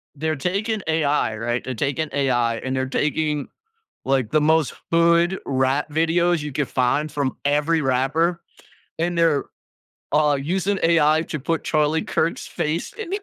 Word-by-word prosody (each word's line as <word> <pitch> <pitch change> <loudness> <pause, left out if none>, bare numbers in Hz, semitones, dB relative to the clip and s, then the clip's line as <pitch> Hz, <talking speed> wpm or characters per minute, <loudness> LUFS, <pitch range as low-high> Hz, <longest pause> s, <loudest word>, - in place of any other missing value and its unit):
They're 155 +2 -1
taking 200 +9 -2
AI, 150 -8 +1
right? 120 +2 -2
They're 130 - -4
taking 140 +5 -2
AI, 120 -4 +1
and 130 +3 -3
they're 130 0 -1
taking, 150 +1 -1 0.6
like, 130 -5 0
the 155 - +3
most 160 -1 +2 0.2
hood 170 +2 +3
rap 135 +3 0
videos 165 +2 +1
you 150 0 -5
could 140 0 -1
find 135 +4 0
from 140 -3 -2
every 150 +3 +2
rapper, 150 +6 +1 0.6
and 170 +1 -1
they're, 165 -4 +2 0.7
uh, 150 -1 +3
using 190 +6 -1
AI 160 -1 +4
to 155 - -5
put 165 +4 -2
Charlie 155 +1 +1
Kirk's 165 +1 -1
face 155 +3 -3
in 420 -5 -7
if 400 +1 -2
150 Hz, 155 wpm, -22 LUFS, 135-165 Hz, 0.7 s, AI